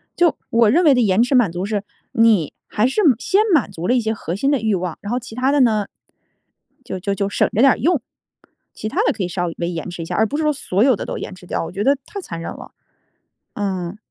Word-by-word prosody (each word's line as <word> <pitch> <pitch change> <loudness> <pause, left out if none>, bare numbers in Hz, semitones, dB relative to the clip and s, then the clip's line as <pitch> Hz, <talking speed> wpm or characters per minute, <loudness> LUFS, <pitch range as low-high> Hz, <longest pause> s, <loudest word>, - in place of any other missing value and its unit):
就 345 -3 +3
我 230 -2 +4
认 335 +10 +4
为 295 - +6
的 250 - +3
延 210 +1 +3
迟 260 +2 +1
满 235 -8 +4
足 175 +2 -3
是， 205 -1 -2 0.3
你 225 - +3
还 215 +2 +1
是 270 - 0 0.2
先 390 +9 +2
满 245 -10 +2
足 175 0 -5
了 - - +3
一 245 - +2
些 220 0 -1
核 180 -5 -5
心 275 +7 +1
的 280 - +2
欲 215 -2 +1
望， 180 -3 -4
然 205 - -5
后 245 - 0
其 235 -2 -11
它 260 +2 +1
的 285 -1 +3
呢， 215 -4 +2 1.0
就 185 - -5
就 200 +2 -2
就 200 0 -1
省 - - +1
着 225 - +2
点 270 -1 +7
儿 - - 0
用， 315 +2 +1 0.7
其 215 - -5
它 - - 0
的 - - +2
可 195 - -4
以 - - -1
稍 175 0 -2
微 170 - -2
延 165 0 -5
迟 175 -1 -7
一 - - -7
下， - - -4
而 220 - +3
不 290 - -3
是 315 - -1
说 305 - +3
所 210 -6 0
有 260 -2 +4
的 - - -6
都 - - -4
延 - - -6
迟 180 - -15
掉， - - -2
我 165 - -7
觉 200 +3 -3
得 275 +2 +3
太 400 - -7
残 170 - -7
忍 - - -5
了。 - - -11 0.8
嗯。 190 -2 -3
215 Hz, 290 characters per minute, -20 LUFS, 185-260 Hz, 1.0 s, 点